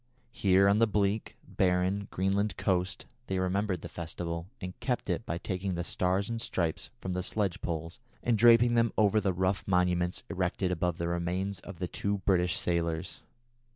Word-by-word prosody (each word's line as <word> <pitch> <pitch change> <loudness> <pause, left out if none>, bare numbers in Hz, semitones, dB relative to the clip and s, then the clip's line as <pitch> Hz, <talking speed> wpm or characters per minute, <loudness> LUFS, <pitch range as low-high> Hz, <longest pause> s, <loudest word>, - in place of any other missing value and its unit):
Here 100 -4 +4
on 100 +2 +4
the 115 - +5
bleak, 105 0 0
barren 95 +2 +1
Greenland 100 +3 0
coast 90 -1 0 0.2
they 95 - -1
remembered 95 -1 0
the - - -4
festival, 85 0 -5
and 90 -1 -5
kept 125 -2 -1
it 115 - -3
by 85 - -1
taking 95 +2 -3
the 85 - -2
Stars 95 +3 0
and 115 -1 -3
Stripes 85 -7 -2
from 95 - -4
the 90 - -1
sledge 100 0 -1
poles 85 +3 -4 0.2
and 120 - +2
draping 120 +2 +6
them 115 -1 +3
over 105 0 +4
the 95 -1 +1
rough 95 +2 0
monuments 90 -1 +1
erected 90 0 -1
above 90 -1 0
the 85 - -2
remains 90 +3 -2
of 95 - -10
the 90 - -2
two 100 +3 -1
British 90 -2 +3
sailors. 85 0 -1
95 Hz, 175 wpm, -30 LUFS, 90-100 Hz, 0.2 s, draping